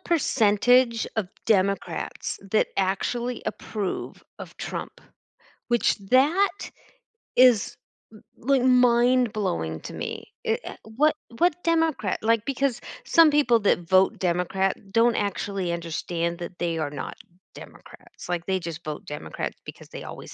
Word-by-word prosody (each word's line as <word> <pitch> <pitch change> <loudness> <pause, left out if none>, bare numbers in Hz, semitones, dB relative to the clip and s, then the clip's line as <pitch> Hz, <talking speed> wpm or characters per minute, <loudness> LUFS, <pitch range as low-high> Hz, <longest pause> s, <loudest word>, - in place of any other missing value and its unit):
percentage 245 -5 +3
of 200 -5 -1 0.2
Democrats 200 -2 0
that 215 - +2
actually 235 +6 -1
approve 205 -4 -4 0.2
of - - -10
Trump, - - -6 0.7
which 240 -1 +2
that 340 +11 +2 0.6
is, 250 -5 +5 0.4
l 215 - -14 0.2
like, 270 +1 +2
mind 250 -1 +4
blowing 80 - -2
to - - -8
me. - - -6
I - - +1
eh - - -7
what 280 +9 +1 0.2
what 355 0 +2
Democrat 325 - +1
like, 230 0 +2
because 275 -2 -1 0.3
some 330 -7 +6
people 245 -6 +4
that 200 - +3
vote 190 0 +4
Democrat 180 +2 0 0.2
don't 230 +3 +3
actually 195 -2 -2
understand 170 0 -3
that 175 +1 -8
they 170 -1 -1
are 155 -2 -2
not 145 -2 -6 0.4
Democrats. - - -13
Like, 175 -1 -2
they 190 -1 0
just 170 -1 -7
vote 150 -1 -6
Democrat 150 0 -5
because - - -11
they - - -8
always - - -9
220 Hz, 135 wpm, -25 LUFS, 180-255 Hz, 0.7 s, some